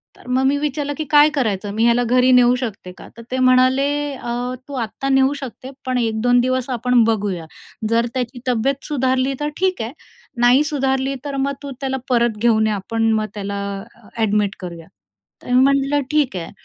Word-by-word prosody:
तर - - -18
मग 255 +1 +1
मी 280 +1 +2
विचारलं 290 0 -2
की 310 - -2
“काय 295 0 +6
करायचं? 210 -9 -2
मी 220 +1 0
ह्याला 235 +1 +3
घरी 250 +2 +3
नेऊ 250 0 +5
शकते 215 -7 -5
का?” - - -12
तर - - -9
ते 260 - -1
म्हणाले, 255 +2 +4 0.3
अ, 245 0 -4
“तू 285 - -9
आत्ता 270 +5 -4
नेऊ 270 +1 +3
शकते, 260 +1 -8
पण 255 -1 0
1-2 235 +1 +2
दिवस 255 0 -1
आपण 245 -1 +2
बघूया. 205 -6 -1 0.4
जर 230 +1 +2
त्याची 250 -1 -3
तब्येत 255 +3 0
सुधारली, 260 -2 0
तर 295 0 -1
ठीक 370 -8 0
आहे. 225 +3 -4 0.5
नाही 250 +4 +5
सुधारली, 270 -2 -1
तर 280 -1 -4
मग 280 - -1
तू 280 - -6
त्याला 265 -1 -1
परत 235 -3 +2
घेऊन 220 -2 +3
ये, 215 - 0
आपण 225 +3 -1
मग 215 0 0
त्याला 200 -1 -5 0.4
अ, 230 -4 -20
ॲडमिट 210 -2 +1
करूया.” 170 -3 -8 0.6
तर 245 - -6
मी 255 - +6
म्हटलं, 275 +1 +2
“ठीक 290 -9 +1
आहे.” 170 -2 -5
250 Hz, 190 wpm, -20 LUFS, 225-270 Hz, 0.6 s, काय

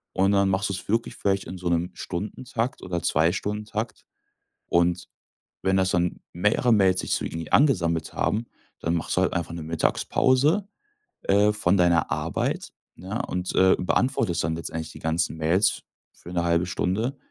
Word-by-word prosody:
Und 95 +1 +3
dann 100 -1 +3
machst 95 +2 0
du's 95 -1 -5
wirklich 115 +2 0
vielleicht 95 -1 0
in 95 - -7
so 90 -1 -3
'nem 85 +1 +1
Stundentakt 115 +6 -4
oder 85 -2 -3
2- 80 0 +3
Stundentakt. 105 +3 -4 0.6
Und 85 +1 +1 0.5
wenn 95 0 +2
das 95 0 +2
dann 90 -1 0
mehrere 105 +7 +2
Mails 95 -4 +4
sich - - -4
so - - -2
irgendwie 80 -1 -5
angesammelt 85 - +3
haben, 110 +3 0 0.4
dann 85 - 0
machst 85 - -2
du - - +3
halt - - +1
einfach 85 -1 -2
'ne 85 - -6
Mittagspause, 130 - +2 0.6
äh, 105 +2 +4
von 100 -2 +2
deiner 85 -3 +3
Arbeit, - - -2 0.2
ne, 95 +6 -4
und, 90 0 -3
äh, 95 0 +5
beantwortest 90 - +1
dann 80 +1 -1
letztendlich 80 -1 -5
die - - -11
ganzen 80 -1 -1
Mails 85 +6 +2 0.3
für 90 - -11
1/2 85 0 +1
Stunde, 110 +9 -1
95 Hz, 165 wpm, -25 LUFS, 85-105 Hz, 0.6 s, äh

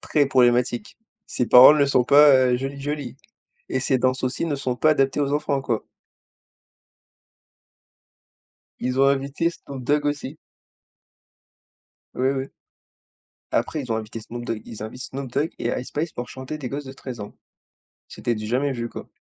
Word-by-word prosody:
Très 145 -2 +1
problématique, 125 -2 +2 0.3
ses 125 - -2
paroles 130 +6 +9
ne - - +6
sont 130 -3 +2
pas 135 -3 +6
jolies 135 +2 -5
jolies 145 -3 -4 0.5
et 130 - -1
ses 130 0 +1
danses 130 +1 0
aussi 130 +5 -1
ne 160 -3 -1
sont 130 -3 -3
pas 155 +4 +3
adaptées 135 -1 +1
aux 140 -1 0
enfants, 145 -1 0
quoi. 115 -4 -2 2.9
Ils 125 +1 -1
ont 135 - +6
invité 140 +4 0
Snoop 140 -5 -10
Dog 145 +3 +1
aussi. 145 0 -3 1.8
Oui, 130 +1 +1
oui. 135 -1 -2 1.1
Après 155 - -1
ils 125 - -5
ont 110 - +1
invité 110 +1 -5
Snoop 120 +2 -8
Dog. 110 -1 -3
Ils 110 -2 -9
invitent 125 +4 -7
Snoop 135 -2 -6
Dog 145 +5 0
et - - -2
Ice 125 - -8
Spice 155 +2 -3
pour 120 - -6
chanter 130 +3 -7
des 130 -5 -6
gosses 145 +2 -5
de 130 - -8
13 130 -3 -8
ans. 105 0 -8 0.7
C'était 120 - -2
du 110 0 -5
jamais 135 +5 0
vu, 120 -2 -4
quoi. - - -9
130 Hz, 165 wpm, -23 LUFS, 125-145 Hz, 2.9 s, paroles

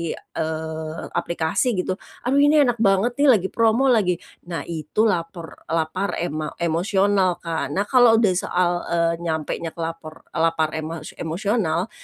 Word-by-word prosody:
eee, 160 0 -5
aplikasi 175 +8 0
gitu, 185 +1 -2 0.2
"Aduh, 265 +3 +2
ini 290 +1 +5
enak 245 -3 0
banget 215 +4 +2
nih, 290 - +5
lagi 190 -2 -1
promo 230 +4 +3
lagi." 200 -7 +3 0.3
Nah, 170 -2 -4
itu 165 +5 -2
lapor 170 -5 -3
lapar 165 +5 -1
ema 155 -2 -4
emosional, 185 +2 +1
Kak. 165 -4 -2
Nah, 200 - +2
kalau 240 +1 +5
udah 220 -4 +4
soal, 180 -1 +1 0.2
eee, 170 0 +1 0.3
nyampenya 165 +2 -4
ke 170 - -6
lapor 165 -1 -6 0.2
lapar 160 -1 +2
ema 160 +1 -5 0.2
emosional, 180 +1 -1
175 Hz, 145 wpm, -22 LUFS, 160-215 Hz, 0.3 s, ini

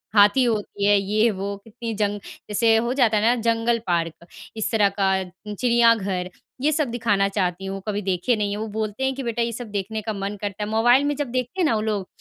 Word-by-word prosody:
हाथी 205 +5 +6
होती 210 -3 -1
है, 205 0 +5
ये-वो, 200 0 0
कितनी 230 +1 -6
जंग 205 -1 -1 0.3
जैसे 225 +2 +3
हो 235 +2 0
जाता 240 -5 +3
है 210 - +1
ना, 235 +2 +4
जंगल 230 +1 +1
पार्क, 170 -1 -1 0.3
इस 220 +1 -1
तरह 210 -3 +3
का, 190 -1 +2 0.3
चिड़ियाघर, 225 -5 +2 0.3
ये 300 +3 +3
सब 305 -3 0
दिखाना 210 -4 +1
चाहती 190 -2 -2
हूँ, 195 0 -5
कभी 205 -1 -1
देखें 190 +5 0
नहीं 205 -1 -1
हैं। 205 - -3
वो 220 +1 -4
बोलते 215 +3 -3
हैं 265 0 +1
कि, 270 - -5
"बेटा, 235 -1 -2
ये 235 0 0
सब 240 +1 -6
देखने 205 +2 -3
का 215 +1 -3
मन 200 0 -4
करता 205 0 -3
है।" 210 - -4
मोबाइल 240 +5 +4
में 290 0 0
जब 290 0 -2
देखते 255 +7 -3
हैं - - +3
ना 240 - +2
वो 215 - 0
लोग, 210 -3 -2
215 Hz, 225 wpm, -23 LUFS, 200-235 Hz, 0.3 s, हाथी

